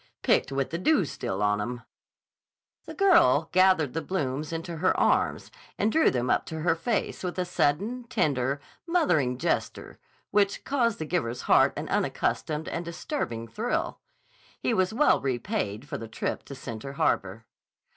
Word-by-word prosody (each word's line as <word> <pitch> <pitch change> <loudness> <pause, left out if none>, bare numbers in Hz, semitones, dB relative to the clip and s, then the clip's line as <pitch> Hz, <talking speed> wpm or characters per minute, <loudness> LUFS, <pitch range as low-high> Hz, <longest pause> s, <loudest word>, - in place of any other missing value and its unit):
"Picked - - +2
with 135 -1 -1
the 170 - -2
dew 215 - +3
still 100 -7 -3
on 105 0 +2
'em." 120 +3 -5 1.0
The - - -8
girl 370 -4 +4
gathered 185 -7 +4
the 165 - -2
blooms 150 -5 -2
into 165 +1 -4
her - - +2
arms - - +1 0.3
and 215 +2 +1
drew 320 - +4
them 125 -1 -1
up - - +1
to 160 -1 -5
her 165 +1 +3
face 200 +7 -2
with 180 0 -3
a 180 - 0
sudden, 200 +9 0
tender, 145 - 0 0.3
mothering 155 - +2
gesture - - -2 0.3
which 200 -1 +2
caused 240 -6 +1
the 155 - -4
giver's 125 -8 -2
heart - - +4
an - - -4
unaccustomed 155 +1 -1
and 170 - -3
disturbing 170 - -4
thrill. 230 - -2 0.6
He - - 0
was 185 -3 +2
well 275 +7 +3
repaid 130 - -2
for - - -5
the 115 - -7
trip 110 - -4
to 140 - -8
Center 130 +1 -7
Harbor. 110 - 0
160 Hz, 160 wpm, -27 LUFS, 130-205 Hz, 1.0 s, girl